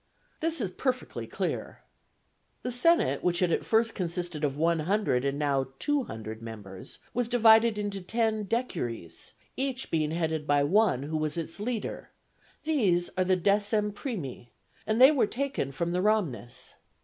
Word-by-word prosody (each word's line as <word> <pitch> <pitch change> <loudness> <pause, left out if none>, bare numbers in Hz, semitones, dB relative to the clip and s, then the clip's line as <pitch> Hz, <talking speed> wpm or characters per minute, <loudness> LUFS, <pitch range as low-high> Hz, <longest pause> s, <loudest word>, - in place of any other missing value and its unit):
This 330 0 0
is 200 -6 -1
perfectly 255 +5 -3
clear. - - -4 0.8
The 250 - -2
senate, 335 +8 +3
which 175 -1 +2
had 175 -1 +2
at - - +1
first 225 0 +2
consisted 175 -4 -3
of 140 -1 0
one 165 +1 +2
hundred 170 -6 +1
and 140 0 -1
now 140 -3 +1
two 290 - 0
hundred 110 0 -7
members, 105 -5 -9 0.2
was 245 -1 0
divided 225 -2 +5
into 205 -2 -3
ten 220 +2 0
decuries, 140 - -3 0.2
each 265 -1 -2
being 155 -2 +1
headed 160 -2 -2
by 145 0 +4
one, 185 - +3
who 155 +2 -2
was 155 +1 -2
its 165 +3 -5
leader; 225 +1 -4 0.5
these 205 - +2
are 185 - +2
the 185 0 +3
decem 205 +3 +2
primi, 170 - -5 0.4
and 220 +1 +1
they 260 +3 +9
were 270 -8 +2
taken 265 - -2
from 170 +5 -2
the 180 +1 0
Ramnes. 130 - -1
185 Hz, 160 wpm, -28 LUFS, 150-225 Hz, 0.8 s, they